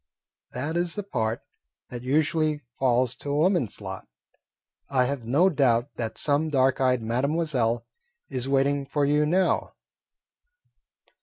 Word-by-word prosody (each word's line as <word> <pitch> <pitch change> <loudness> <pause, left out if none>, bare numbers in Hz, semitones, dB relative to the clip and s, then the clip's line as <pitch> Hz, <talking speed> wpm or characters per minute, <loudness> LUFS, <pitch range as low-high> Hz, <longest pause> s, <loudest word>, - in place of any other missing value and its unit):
"That 145 +6 -3
is 175 -1 0
the 205 - -3
part 115 - -2 0.5
that 120 -1 -6
usually 150 +3 +1 0.2
falls 125 -1 +2
to 145 - -7
a 140 - 0
woman's 165 - +1
lot. 95 -2 -7 0.8
I 130 -2 +2
have 130 -2 -3
no 145 +11 +4
doubt 135 -6 +2
that 110 -1 -4
some 150 +2 +1
dark 135 -2 +2
eyed 125 -3 +2
mademoiselle 125 -1 0 0.4
is 130 +2 -3
waiting 140 0 +1
for 145 0 0
you 150 +1 +2
now." 185 +4 +1
135 Hz, 135 wpm, -26 LUFS, 125-150 Hz, 0.8 s, no